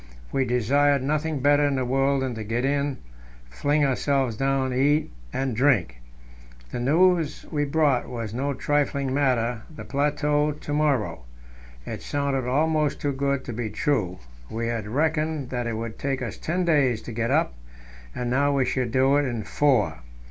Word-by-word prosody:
We 135 -1 +1
desired 135 +4 +2
nothing 155 0 -1
better 145 +1 +4
in 140 - 0
the 130 -1 0
world 135 +1 +1
than 130 -2 -2
to 110 -1 -5
get 115 +4 -1
in, 140 -1 0 0.5
fling 145 - +1
ourselves 135 -2 +1
down, 135 +1 0
eat, 145 +4 +2 0.2
and 130 -3 -2
drink. 105 - +2 0.7
The - - -3
news 160 +3 +2
we 145 -2 0
brought 145 -4 +1
was 115 -4 -5
no 140 +3 -1
trifling 140 -1 0
matter 125 -4 +1
the 155 - -10
plateau 150 +1 +1
to 145 0 -6
morrow. 140 - 0 0.6
It - - -6
sounded 140 -3 -1
almost 150 +2 +1
too 145 - -1
good 140 0 -1
to 120 - -5
be 115 0 -3
true; 105 -10 -1 0.3
we 115 +1 -2
had 115 -3 -3
reckoned 155 +2 -1
that 120 -2 -2
it 115 -1 -2
would 115 0 -6
take 135 -2 -2
us 120 - -4
ten 175 +3 -1
days 140 -9 +2
to - - -7
get 115 +1 -1
up, - - +2 0.6
and 125 - -3
now 140 +2 +3
we 130 - +3
should 125 -3 -1
do 135 +3 +4
it 145 - +2
in 120 -4 -3
four. 110 - +1
135 Hz, 170 wpm, -25 LUFS, 120-145 Hz, 0.7 s, better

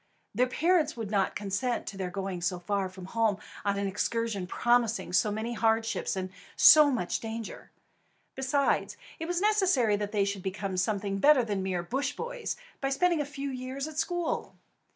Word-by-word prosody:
Their 250 +5 +2
parents 320 +1 +1
would 220 -3 -5
not 195 -2 +1
consent 210 +5 -2
to 195 - -6
their 190 -2 -3
going 190 -1 -4
so 180 +1 0
far 195 +1 -2
from 185 -1 -10
home, 220 0 +1 0.3
on 200 -1 0
an 200 - -1
excursion 205 0 -1
promising 240 -2 +1
so 210 +3 +3
many 220 +3 -3
hardships 225 -1 0
and 185 -1 -4 0.2
so 305 -1 +8
much 235 -10 -1
danger. 225 0 -7 0.6
Besides, 265 +1 0 0.2
it 325 - -4
was 350 +1 -1
necessary 380 - +3
that 205 0 -3
they 205 -2 +2
should 200 -1 -3
become 195 0 -3
something 200 0 -1
better 285 +1 +6
than 205 -3 -2
mere 185 -2 -2
Bush 265 +10 -2
Boys, - - -4 0.3
by 270 - 0
spending 340 +3 +2
a - - -2
few 280 -1 -5
years 260 +2 -4
at 310 -1 -5
school. 350 -2 -2
225 Hz, 175 wpm, -29 LUFS, 195-275 Hz, 0.6 s, so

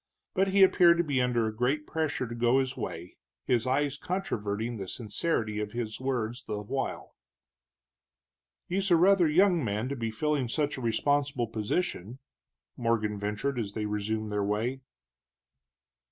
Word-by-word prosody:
But 190 +1 +2
he 195 0 +5
appeared 175 -2 +6
to 170 - +3
be 140 -5 0
under 120 -2 +1
a 110 0 -3
great 135 +6 0
pressure 155 -5 -1
to 115 - -6
go 120 +2 +3
his 135 -1 0
way, 85 +2 -6 0.3
his 125 -1 +1
eyes 140 +2 0
controverting 115 - -2
the 95 -2 -5
sincerity 110 - -2
of 105 0 -4
his 115 -2 -4
words 120 -2 -2
the 105 - -3
while. 135 +6 -4 1.5
"He's 195 +2 -1
rather 180 +1 +5
a - - 0
young 180 -1 +4
man 105 +3 -1
to 140 - -2
be 115 -3 -2
filling 145 +3 0
such 145 +3 0
a 130 - -7
responsible 135 +2 +1
position," 115 - -2 0.6
Morgan 110 -3 0
ventured 105 +6 -2
as 100 -3 -3
they 110 0 -2
resumed 105 +1 -2
their 105 -1 0
way. 110 +6 -1
120 Hz, 155 wpm, -29 LUFS, 110-150 Hz, 1.5 s, appeared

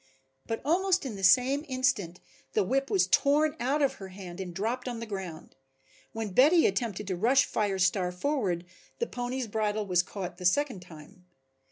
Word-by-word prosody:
But 225 - -3
almost 370 +2 +2
in 240 -6 -4
the 195 - -8
same 260 +8 +4
instant 250 - 0 0.3
the 430 -2 +2
whip 270 -3 0
was 390 -3 +3
torn 300 +2 +3
out 280 +4 +1
of 275 - +2
her 195 - -6
hand 185 -1 -9
and 180 -2 -6
dropped 230 +8 -3
on 240 -2 -4
the 230 - -5
ground. 190 -6 -7 0.6
When 220 -2 -4
Betty 305 - +5
attempted 210 0 -1
to 190 -1 -2
rush 255 +9 +3
Fire 205 -3 -1
Star 185 -1 +1
forward 180 - -1 0.3
the 475 - -1
pony's 250 - -4
bridle 215 -1 -1
was 180 -2 +3
caught 185 0 -7
the 180 - -6
second 265 +1 +1
time. 180 +2 -14
220 Hz, 180 wpm, -29 LUFS, 185-270 Hz, 0.6 s, Betty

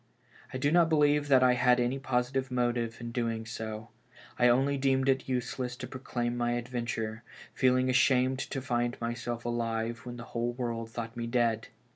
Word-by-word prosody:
I - - -3
do 145 +3 +1
not 170 -1 +5
believe 150 -2 +3
that 130 -2 +5
I 125 -1 +6
had 125 0 +4
any 125 +3 0
positive 130 +1 -1
motive 120 -2 -1
in 120 0 -6
doing 115 -2 -2
so. 110 -1 -6 0.5
I 125 - +6
only 135 +4 +3
deemed 135 -1 +1
it 135 0 +1
useless 125 0 -2
to 125 - -6
proclaim 120 -2 -3
my 120 0 0
adventure, 120 -2 -3 0.3
feeling 130 0 +3
ashamed 130 0 +3
to 135 -1 -4
find 120 -2 -1
myself 120 0 -4
alive 115 -1 -2
when 120 -1 -7
the 120 - -7
whole 120 0 -1
world 115 -2 -3
thought 115 0 -6
me 115 0 -3
dead. 115 -2 +1
120 Hz, 175 wpm, -30 LUFS, 115-130 Hz, 0.5 s, I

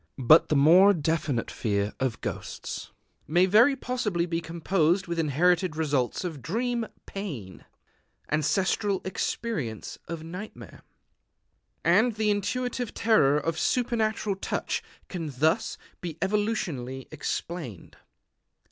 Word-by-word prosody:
But 155 +7 +7
the 155 - +2
more 180 +8 +7
definite 155 -6 -1
fear 100 -1 -1
of 130 -3 -1
ghosts - - -5 0.4
may 175 +4 +4
very 225 +9 +5
possibly 230 -10 -1
be 165 -1 -2
composed 170 +2 +1
with 170 -2 -3
inherited 165 +3 +2
results 145 -5 0
of 160 -6 -5
dream 235 - -1 0.2
pain, 135 - -7 0.7
ancestral 190 +6 +1
experience 190 - -3
of 165 -1 -5
nightmare. 180 +6 -9 1.0
And 215 +7 +4
the 215 -1 +2
intuitive 245 +3 -2
terror 150 -11 +4
of 160 +2 -2
supernatural 220 -5 0
touch - - -2 0.3
can 165 -5 -4
thus 160 - +1 0.2
be 170 -3 -5
evolutionally 170 - -2
explained. 150 - -5
175 Hz, 110 wpm, -27 LUFS, 150-210 Hz, 1.0 s, But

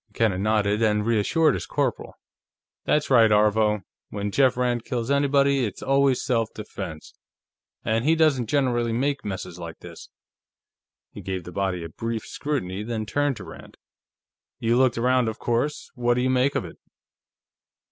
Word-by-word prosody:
McKenna 105 -5 0
nodded 105 +1 +1
and 105 -1 +2
reassured 115 +8 +2
his - - -4
corporal. 140 -5 -2 0.7
"That's 150 -2 +1
right, 115 -4 +6
Aarvo; 105 0 +3 0.3
when 100 0 -4
Jeff 130 +1 +3
Rand 120 -2 0
kills 120 0 -3
anybody, 140 -1 +3
it's 105 -5 -4
always 135 -1 +2
self 115 -3 0
defense. 95 -7 -8 0.7
And 110 +1 +1
he 160 +4 +3
doesn't 150 -7 +2
generally 120 -5 +1
make 140 +4 -1
messes 95 -3 -6
like 85 -1 -7
this." - - -11 1.0
He - - -9
gave 95 -2 -4
the 90 - -9
body 95 -2 -2
a 80 - -6
brief 115 +6 -4
scrutiny, 100 -10 -3
then 110 0 -3
turned 145 +3 0
to 95 - -8
Rand. 80 - -12 0.8
"You 115 +1 +1
looked 130 -1 +3
around, 125 0 +2
of 110 - -6
course; 120 +5 -2
what 120 -2 +1
do 125 - 0
you 130 +1 +1
make 130 +2 +2
of - - -1
it?" - - -12
115 Hz, 160 wpm, -24 LUFS, 105-135 Hz, 1.0 s, right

